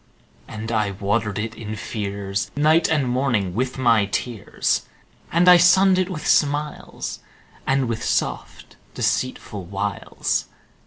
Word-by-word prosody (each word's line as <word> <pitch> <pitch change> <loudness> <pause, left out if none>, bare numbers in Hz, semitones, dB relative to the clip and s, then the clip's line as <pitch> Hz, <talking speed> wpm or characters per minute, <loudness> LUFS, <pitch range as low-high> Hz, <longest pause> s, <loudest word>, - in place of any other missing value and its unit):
And 110 +1 -6
I 105 -3 +1
watered 100 +2 -1
it 110 +1 -3
in 110 -1 -6
fears, 100 -2 -4
Night 155 +3 +3
and 150 -5 +1
morning 120 -7 0
with 130 +5 -2
my 115 -5 +3
tears; 100 +3 -2 0.4
And 170 +2 +3
I 180 0 +10
sunned 185 +2 +5
it 185 0 0
with 155 -5 -5
smiles, 150 +1 0 0.5
And 135 -1 +2
with 115 0 -3
soft - - -3 0.2
deceitful - - -2
wiles. - - -2
120 Hz, 125 wpm, -22 LUFS, 105-150 Hz, 0.5 s, I